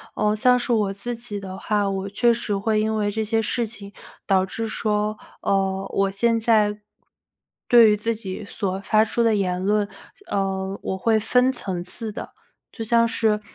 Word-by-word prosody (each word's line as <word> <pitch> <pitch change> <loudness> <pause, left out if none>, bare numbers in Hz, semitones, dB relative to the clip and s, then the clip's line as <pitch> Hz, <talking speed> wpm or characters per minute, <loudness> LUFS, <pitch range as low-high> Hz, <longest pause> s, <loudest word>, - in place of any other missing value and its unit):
呃， 210 0 +1
像 250 +3 +4
是 245 0 -2
我 210 -4 +1
自 240 +5 -4
己 230 -3 -6
的 190 -1 -7
话， 205 0 0
我 195 0 -3
确 235 +4 +3
实 230 -3 -2
会 215 +2 +1
因 220 +1 0
为 205 -1 0
这 220 +1 -2
些 225 +1 +1
事 230 +1 -1
情， 205 -2 -8 0.3
导 190 -2 +3
致 225 +4 -4
说， 210 -1 -1 0.2
呃， 195 0 0
我 195 0 +2
现 230 +3 +1
在， 215 -2 +2 0.9
对 235 -3 +7
于 210 - +2
自 225 +2 -1
己 210 -1 -7
所 195 -1 -3
发 215 +2 +3
出 230 +2 -1
的 225 -2 +3
言 180 -3 -1
论， 205 0 +1 0.4
呃， 195 0 -2
我 190 - -3
会 220 +3 +2
分 250 +4 +3
层 190 -8 -4
次 220 +5 -5
的。 - - -7 0.4
就 225 - -6
像 230 +1 +4
是， 220 -2 +1
210 Hz, 200 characters per minute, -23 LUFS, 195-225 Hz, 0.9 s, 对